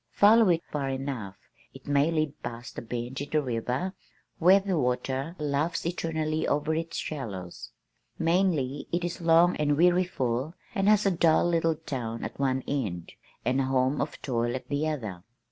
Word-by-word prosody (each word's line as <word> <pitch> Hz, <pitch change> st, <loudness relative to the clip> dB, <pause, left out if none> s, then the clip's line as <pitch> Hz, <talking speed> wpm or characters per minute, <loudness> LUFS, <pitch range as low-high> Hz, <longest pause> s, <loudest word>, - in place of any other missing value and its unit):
Follow 215 Hz, 0 st, +6 dB
it 170 Hz, -1 st, +2 dB
far 140 Hz, -2 st, -2 dB
enough, 130 Hz, -8 st, -4 dB, 0.4 s
it -, -, -13 dB
may 145 Hz, +2 st, +3 dB
lead 155 Hz, -3 st, -1 dB
past 120 Hz, 0 st, -7 dB
a -, -, -5 dB
bend 120 Hz, +3 st, -5 dB
in 145 Hz, -, -5 dB
the 155 Hz, -, +2 dB
river 130 Hz, +6 st, -2 dB, 0.5 s
where 185 Hz, +4 st, +7 dB
the 195 Hz, -1 st, -1 dB
water 130 Hz, +3 st, -1 dB
laughs 150 Hz, +3 st, -1 dB
eternally 160 Hz, -2 st, -1 dB
over 150 Hz, +2 st, +1 dB
its 165 Hz, +1 st, -3 dB
shallows. 100 Hz, -, -5 dB, 0.5 s
Mainly 165 Hz, -6 st, +1 dB
it 175 Hz, +1 st, 0 dB
is 175 Hz, 0 st, -4 dB
long 170 Hz, +1 st, +5 dB
and 145 Hz, -1 st, +1 dB
weariful 165 Hz, -5 st, +1 dB, 0.2 s
and 195 Hz, +1 st, +2 dB
has 210 Hz, -1 st, +4 dB
a 195 Hz, -, +4 dB
dull 165 Hz, -2 st, +3 dB
little 165 Hz, -1 st, +2 dB
town 125 Hz, -8 st, -5 dB
at -, -, -6 dB
one 130 Hz, -1 st, +1 dB
end, 100 Hz, -12 st, -3 dB, 0.3 s
and 130 Hz, +3 st, +2 dB
a -, -, 0 dB
home 130 Hz, +1 st, +1 dB
of 145 Hz, -, -4 dB
toil 120 Hz, -2 st, 0 dB
at 130 Hz, -, -7 dB
the 145 Hz, +2 st, 0 dB
other. 110 Hz, -, -4 dB
145 Hz, 170 wpm, -28 LUFS, 130-165 Hz, 0.5 s, where